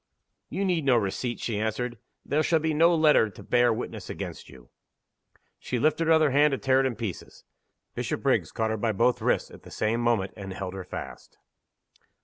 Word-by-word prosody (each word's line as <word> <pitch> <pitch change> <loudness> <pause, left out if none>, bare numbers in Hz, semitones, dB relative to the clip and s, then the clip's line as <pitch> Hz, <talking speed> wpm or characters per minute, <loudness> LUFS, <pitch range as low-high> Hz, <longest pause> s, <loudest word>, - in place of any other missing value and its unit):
"You 200 - -2
need 175 -4 +1
no 130 -3 +4
receipt," 115 +3 -2
she 110 -3 -2
answered. 110 +2 -2 0.3
"There 150 +3 +1
shall 165 +1 +2
be 160 0 -1
no 165 +3 +4
letter 155 -8 +4
to 100 - -13
bear 120 -1 +3
witness 115 +2 -5
against - - -7
you!" 60 -3 -16 0.9
She 125 - -3
lifted 155 +5 +1
her 165 - +6
other 155 -3 +4
hand 145 +1 +4
to - - 0
tear 130 0 +2
it 135 - +2
in 125 - -3
pieces. 105 -5 -7 0.5
Bishopriggs - - -1
caught 110 -1 -1
her 110 - -1
by 110 +1 0
both 120 +5 +2
wrists, - - 0
at - - -13
the - - -14
same 115 +2 -1
moment, 115 -5 +1
and 95 -2 -7
held 95 -1 -5
her 95 -1 -6
fast. 90 - -9
120 Hz, 195 wpm, -27 LUFS, 110-150 Hz, 0.9 s, her